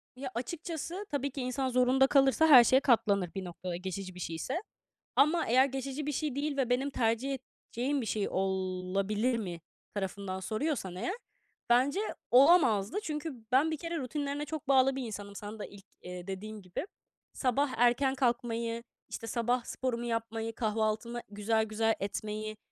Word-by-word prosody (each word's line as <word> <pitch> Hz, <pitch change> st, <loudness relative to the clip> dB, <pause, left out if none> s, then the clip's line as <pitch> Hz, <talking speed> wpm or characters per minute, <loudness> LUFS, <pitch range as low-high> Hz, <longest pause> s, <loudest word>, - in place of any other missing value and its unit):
Ya, 260 Hz, 0 st, -5 dB
açıkçası, 335 Hz, -, -4 dB
tabii 280 Hz, -1 st, -1 dB
ki 275 Hz, -, -5 dB
insan 255 Hz, +1 st, -1 dB
zorunda 255 Hz, +2 st, +4 dB
kalırsa 275 Hz, +3 st, +4 dB
her 255 Hz, -5 st, +10 dB
şeye 260 Hz, +3 st, +5 dB
katlanır 200 Hz, -8 st, +3 dB
bir 190 Hz, -, -3 dB
noktada 175 Hz, +1 st, -5 dB
geçici 185 Hz, +1 st, -5 dB
bir 180 Hz, -, -9 dB
şeyse. 165 Hz, -, -3 dB, 0.6 s
Ama 325 Hz, +4 st, +4 dB
eğer 255 Hz, +3 st, +5 dB
geçici 270 Hz, +2 st, -4 dB
bir 295 Hz, -, -1 dB
şey 290 Hz, -1 st, -2 dB
değil 285 Hz, 0 st, -2 dB
ve 255 Hz, -3 st, +1 dB
benim 260 Hz, +3 st, +1 dB
tercih 255 Hz, +2 st, 0 dB, 0.3 s
edeceğim 270 Hz, +4 st, -1 dB
bir 230 Hz, -, -4 dB
şey 210 Hz, -2 st, -1 dB
olabilir 190 Hz, +4 st, 0 dB
mi 175 Hz, -6 st, -5 dB, 0.3 s
tarafından 195 Hz, -1 st, -3 dB
soruyorsan 215 Hz, -, -2 dB
eğer 365 Hz, -, -2 dB, 0.5 s
bence 265 Hz, +9 st, +4 dB, 0.3 s
olamazdı. 260 Hz, -, +5 dB
Çünkü 305 Hz, -2 st, -3 dB, 0.2 s
ben 285 Hz, +5 st, +4 dB
bir 315 Hz, -, -2 dB
kere 335 Hz, +2 st, -4 dB
rutinlerine 285 Hz, +2 st, -3 dB
çok 310 Hz, -3 st, -6 dB
bağlı 265 Hz, 0 st, +4 dB
bir 265 Hz, -, -3 dB
insanım 205 Hz, -3 st, -7 dB
sana 210 Hz, +1 st, -7 dB
da -, -, -4 dB
ilk, 200 Hz, -1 st, -14 dB, 0.2 s
eee, 180 Hz, 0 st, -8 dB
dediğin 210 Hz, +2 st, -6 dB
gibi. 185 Hz, -, -5 dB, 0.5 s
Sabah 270 Hz, +1 st, +1 dB
erken 245 Hz, +3 st, +3 dB
kalkmayı, 235 Hz, -2 st, 0 dB, 0.3 s
işte, 225 Hz, -, -6 dB
sabah 240 Hz, +1 st, 0 dB
sporumu 240 Hz, -2 st, -3 dB
yapmayı, 225 Hz, -1 st, -2 dB
kahvaltımı 220 Hz, +2 st, -1 dB
güzel, 220 Hz, +2 st, +1 dB
güzel 225 Hz, +1 st, +1 dB
etmeyi, 215 Hz, +2 st, -4 dB
240 Hz, 160 wpm, -31 LUFS, 210-275 Hz, 0.6 s, her